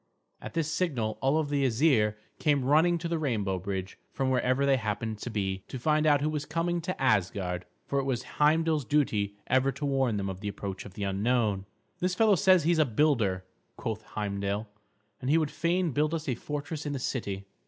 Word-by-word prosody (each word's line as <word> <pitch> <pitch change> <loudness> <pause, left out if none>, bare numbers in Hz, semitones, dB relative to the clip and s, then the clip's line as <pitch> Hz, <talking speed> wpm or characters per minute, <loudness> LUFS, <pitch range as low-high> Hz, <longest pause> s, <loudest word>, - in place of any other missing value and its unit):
At - - -8
this 160 -1 0
signal 130 -12 -1
all 145 +4 +2
the 145 -1 0
Æsir 115 -4 +3 0.2
came 145 -4 +2
running 160 +5 +4
to 170 0 -4
the 165 -1 -1
rainbow 105 -10 -1
bridge, 95 0 -5
from 130 -1 -1
wherever 130 +2 +2
they 135 -1 +4
happened 110 -1 -3
to 120 - -5
be, 95 -3 -2
to - - -6
find 155 +4 +2
out 145 -2 +4
who 150 - +1
was 150 -2 -2
coming 170 +3 -1
to 185 +3 -4
Asgard. 95 -7 0 0.2
For 140 - 0
it 135 - -1
was 130 -2 -1 0.2
Heimdal's 155 0 +3
duty 110 -8 +1
ever 130 +2 +2
to 140 +3 -4
warn 135 -5 +1
them 100 -1 -2
of 95 -1 -5
the 105 - -5
approach 100 -1 -5
of 95 - -11
the 105 - -4
unknown. 100 0 0 0.3
"This 180 0 0
fellow 220 +1 +5
says 185 -2 +5
he 165 - +3
is 170 - +2
a - - +7
builder," 110 -8 +1 0.3
quoth 110 -1 -3
Heimdal. 100 0 -2 0.5
"And 130 - -2
he 155 - +5
would 155 -3 0
fain 170 +2 0
build 150 +4 +1
us 160 -1 -5
a 130 - +1
fortress 145 +4 -5
in 145 - -2
the - - -2
city." 100 -7 -3
135 Hz, 205 wpm, -29 LUFS, 105-155 Hz, 0.5 s, a